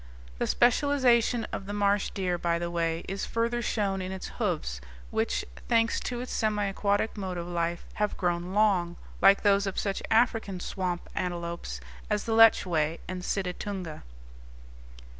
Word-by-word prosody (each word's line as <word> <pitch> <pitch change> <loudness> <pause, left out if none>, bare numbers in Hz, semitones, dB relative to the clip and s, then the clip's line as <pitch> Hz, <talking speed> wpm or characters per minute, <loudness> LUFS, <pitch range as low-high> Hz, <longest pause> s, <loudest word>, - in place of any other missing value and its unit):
The - - 0
specialization 245 -2 +3
of 195 - -5
the 205 - -4
marsh 205 0 +2
deer, 180 -3 -2
by 170 -1 +1
the 170 0 -3
way, 165 -1 -1
is 195 +1 -3
further 235 +1 0
shown 200 -4 -1
in 185 0 -4
its 190 -1 -6
hoofs, - - -1 0.3
which, - - 0 0.2
thanks 230 -1 +3
to 245 -1 -4
its 250 - -5
semi 210 -2 +1
aquatic 200 +2 0
mode 190 -3 -4
of 170 - -4
life, 170 0 -2
have 210 -1 -1
grown 175 0 -1
long, 190 -5 +3 0.3
like 195 0 +6
those 200 -1 +4
of 195 - -4
such 195 -2 -1
African 225 -4 +2
swamp 180 -1 -3
antelopes 170 - -4 0.3
as 210 -1 0
the 225 - -1
lechwe 175 -8 +5
and 185 0 -4
situtunga. 180 -2 -3
195 Hz, 155 wpm, -28 LUFS, 175-215 Hz, 0.3 s, like